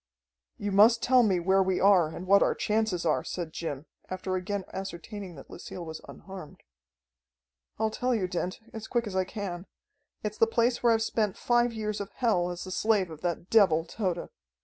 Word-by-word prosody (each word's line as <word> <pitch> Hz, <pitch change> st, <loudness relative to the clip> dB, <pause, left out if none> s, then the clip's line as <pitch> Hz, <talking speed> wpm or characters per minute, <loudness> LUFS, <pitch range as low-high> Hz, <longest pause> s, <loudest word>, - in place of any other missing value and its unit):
"You 205 Hz, 0 st, -3 dB
must 220 Hz, +4 st, +6 dB
tell 255 Hz, 0 st, +5 dB
me 195 Hz, -6 st, +2 dB
where 190 Hz, +3 st, +3 dB
we 190 Hz, -1 st, +1 dB
are 190 Hz, -5 st, +5 dB
and 170 Hz, +3 st, -7 dB
what 200 Hz, +1 st, +5 dB
our -, -, +3 dB
chances 210 Hz, -5 st, 0 dB
are," 155 Hz, -, +2 dB
said 170 Hz, -3 st, -5 dB
Jim, 145 Hz, -3 st, -5 dB, 0.2 s
after 185 Hz, 0 st, -3 dB
again 195 Hz, +2 st, -2 dB
ascertaining 190 Hz, 0 st, -6 dB
that 135 Hz, -, -12 dB
Lucille 175 Hz, 0 st, -8 dB
was 160 Hz, -1 st, -7 dB
unharmed. 190 Hz, -6 st, -11 dB, 1.1 s
"I'll 220 Hz, 0 st, 0 dB
tell 250 Hz, +2 st, 0 dB
you, 190 Hz, -5 st, 0 dB
Dent, 180 Hz, +3 st, -3 dB
as 220 Hz, -1 st, -7 dB
quick 240 Hz, -1 st, 0 dB
as 200 Hz, -3 st, -5 dB
I 190 Hz, 0 st, +2 dB
can. 185 Hz, -3 st, -6 dB, 0.6 s
It's 210 Hz, 0 st, -4 dB
the 225 Hz, -, +5 dB
place 235 Hz, +1 st, +1 dB
where 235 Hz, -, +4 dB
I've 225 Hz, -1 st, +2 dB
spent 215 Hz, -3 st, -1 dB
five 240 Hz, 0 st, +2 dB
years 215 Hz, -2 st, -3 dB
of 200 Hz, -, -5 dB
hell 195 Hz, -8 st, +1 dB
as 175 Hz, 0 st, -5 dB
the 185 Hz, -, -7 dB
slave 200 Hz, -3 st, +1 dB
of 155 Hz, -, -10 dB
that 175 Hz, 0 st, -3 dB
devil, 175 Hz, -8 st, +5 dB
Tode. 180 Hz, -2 st, -3 dB
195 Hz, 195 wpm, -28 LUFS, 180-220 Hz, 1.1 s, must